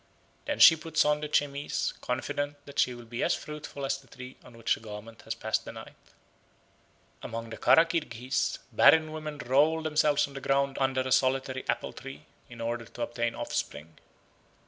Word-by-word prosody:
Then - - -2
she 160 - +9
puts 160 0 0
on 150 0 +2
the 150 - -3
chemise, 145 -1 0
confident 145 +3 -2
that 140 0 -6
she 125 - +2
will 120 0 -11
be 120 +1 -5
as - - +2
fruitful 150 -2 -7
as 135 0 -1
the 135 - -21
tree 125 +1 -10
on 120 - -15
which 115 - +1
the - - -4
garment 110 +1 -10
has 110 - -3
passed 110 -1 -1
the - - -8
night. - - -10 1.3
Among 115 0 -6
the 110 - -6
Kara 165 - +6
Kirghiz 130 -7 -1
barren 160 -1 +6
women 155 -1 -6
roll 150 +5 +2
themselves 150 -1 +3
on 140 - -13
the 135 - -7
ground 135 0 +1
under 130 -1 +1
a 130 0 -3
solitary 130 0 +1
apple - - -1
tree, 135 0 -10 0.2
in 120 -1 -10
order 115 0 -3
to 120 +3 -6
obtain 120 0 -2
offspring. 80 +2 -4
135 Hz, 185 wpm, -29 LUFS, 120-150 Hz, 1.3 s, she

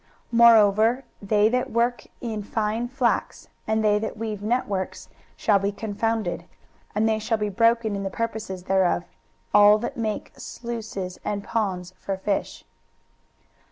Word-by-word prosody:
23:019:009 - - -34 0.2
Moreover 230 +1 +6 0.2
they 210 +1 +3
that 250 +2 0
work 235 +1 0
in 220 -3 -3
fine 220 +2 -2
flax, 250 -1 -1 0.2
and 220 0 +1
they 210 -1 +3
that 220 0 -4
weave 215 -2 -4
networks, 205 -4 -2 0.3
shall 205 -2 +3
be 200 +1 -1
confounded. 220 +2 -2
23:019:010 - - -20 0.5
And 215 +1 +2
they 220 0 +1
shall 220 +1 0
be 210 -1 -1
broken 230 +1 +2
in 200 - -3
the 195 - -2
purposes 215 -3 -4
thereof, 185 -2 +2 0.5
all 205 +1 +7
that 240 +3 -5
make 220 -2 -3
sluices 220 -6 -6
and 205 -1 -3
ponds 185 -5 -2
for 195 -1 -3
fish. 195 +1 -3
215 Hz, 150 wpm, -24 LUFS, 200-230 Hz, 0.5 s, all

